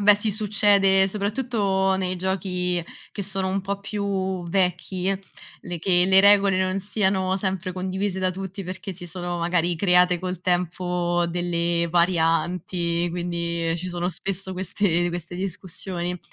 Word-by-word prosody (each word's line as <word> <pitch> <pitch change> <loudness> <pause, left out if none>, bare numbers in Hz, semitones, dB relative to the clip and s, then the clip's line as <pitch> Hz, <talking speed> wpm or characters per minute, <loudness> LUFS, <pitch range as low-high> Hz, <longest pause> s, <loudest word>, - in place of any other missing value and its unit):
Beh, 205 0 +7
sì, 210 +1 -1
succede 200 -2 +3
soprattutto 200 -2 0
nei 185 -1 -1
giochi 180 -1 -1 0.3
che 205 - -4
sono 195 -1 -1
un 195 +1 -1
po' 200 +1 -4
più 195 -3 -2
vecchi, 185 +1 0
l 195 - -1 0.5
le 175 -1 -3
che 180 +1 +3
le 190 0 +6
regole 200 -1 +5
non 185 +1 0
siano 190 -2 +1
sempre 190 -1 -2
condivise 190 +1 -2
da 185 0 +1
tutti 190 +1 -6
perché 190 +2 -6
si 175 0 -8
sono 175 0 -4
magari 175 0 +1
create 180 0 +4
col 180 -1 -4
tempo 175 -1 0
delle 170 -1 0
varianti, 170 0 +1
quindi, 170 -1 -2
ehm, 165 - 0
ci 180 +2 -5
sono 175 0 -2
spesso 190 +2 -3
queste 180 -1 +1
queste 175 0 -5
discussioni. 180 -1 -4
185 Hz, 145 wpm, -24 LUFS, 175-195 Hz, 0.5 s, Beh